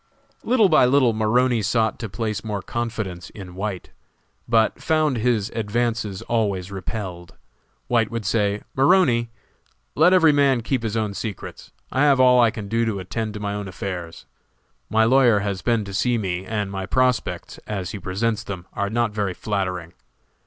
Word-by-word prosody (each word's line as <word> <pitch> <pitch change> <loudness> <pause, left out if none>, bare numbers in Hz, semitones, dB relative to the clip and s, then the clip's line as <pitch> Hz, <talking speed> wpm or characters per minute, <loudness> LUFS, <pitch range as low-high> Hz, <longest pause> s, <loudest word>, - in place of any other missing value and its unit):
Little 230 -4 +4
by 155 -7 +5
little 125 -2 +4
Maroney 115 +2 +2
sought 110 +1 0
to 115 - -5
place 105 0 -3
more 105 -3 -4
confidence 110 -7 -4
in 95 -4 -10
White, 95 0 -5 0.6
but 115 -1 +2
found 155 -4 +1
his 115 -3 0
advances 110 -2 -2
always 100 -5 -1
repelled. 90 -3 -6 0.5
White 115 -2 +1
would 115 -3 -4
say, 105 -1 0
"Maroney, 135 -6 +3 0.6
let 160 +4 +5
every 170 -4 +6
man 140 -4 +3
keep 125 +2 -1
his 115 -1 -2
own 105 -2 -1
secrets, 105 0 -7 0.2
I 135 - 0
have 140 -2 +4
all 125 -1 +6
I 120 - +5
can 105 -2 -6
do 115 +3 +1
to 110 -4 -1
attend 110 +3 -4
to - - -5
my 100 -1 -3
own 105 -1 -4
affairs. 90 -2 -6 0.6
My 110 +1 +3
lawyer 120 -4 +4
has 100 -2 -3
been 115 -3 +1
to 100 - -8
see 120 +5 +1
me 95 -3 -3
and 105 -3 -2
my 95 -1 -4
prospects, 130 +2 0
as 95 -4 -4
he 105 - -6
presents 100 +5 -1
them, 90 -3 -7
are 100 0 -2
not 120 0 0
very 100 -3 -2
flattering. 95 -5 -3
110 Hz, 170 wpm, -23 LUFS, 100-120 Hz, 0.6 s, every